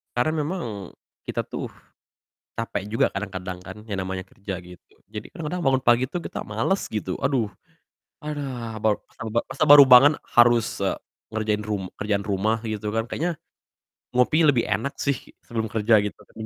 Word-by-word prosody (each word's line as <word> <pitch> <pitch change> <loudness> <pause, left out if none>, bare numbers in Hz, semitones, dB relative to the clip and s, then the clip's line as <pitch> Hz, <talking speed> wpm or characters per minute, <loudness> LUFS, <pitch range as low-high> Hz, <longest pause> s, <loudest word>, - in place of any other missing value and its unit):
Karena 125 +6 +2
memang 175 +2 -3 0.6
kita - - -4
tuh - - -5 0.9
capek 115 -4 -2
juga 115 - +3
kadang-kadang 95 -2 -4
kan, - - -9
yang 95 -3 -2
namanya 95 0 -5
kerja 100 -1 -6
gitu. 90 -1 -16
Jadi, 105 0 -7
kadang-kadang 175 -1 -4
bangun 135 -1 +3
pagi 120 +1 +5
tuh 175 +7 -4
kita - - -5
males 115 - 0
gitu, 100 -4 -2
"Aduh 130 -5 +2 0.8
aduh 130 -7 -4
baru 110 -1 +3
masa - - -20
baru 120 - +4
masa - - 0
baru 145 0 +11
bangun 135 +4 +9 0.2
harus, 120 -1 +4
eee, 100 -1 0 0.4
ngerjain 110 -1 0
rum 105 -3 -2 0.2
kerjaan 100 -1 0
rumah 105 +2 +1
gitu 110 -2 -4
kan, 115 - +1
kayaknya 165 +8 -2 0.8
ngopi 125 +5 +4
lebih 130 -5 +4
enak 140 - -1
sih 140 -1 +1 0.3
sebelum 110 -2 -2
kerja" 110 +1 +2
gitu 105 - -4
kan, - - -26
115 Hz, 165 wpm, -24 LUFS, 105-135 Hz, 0.9 s, baru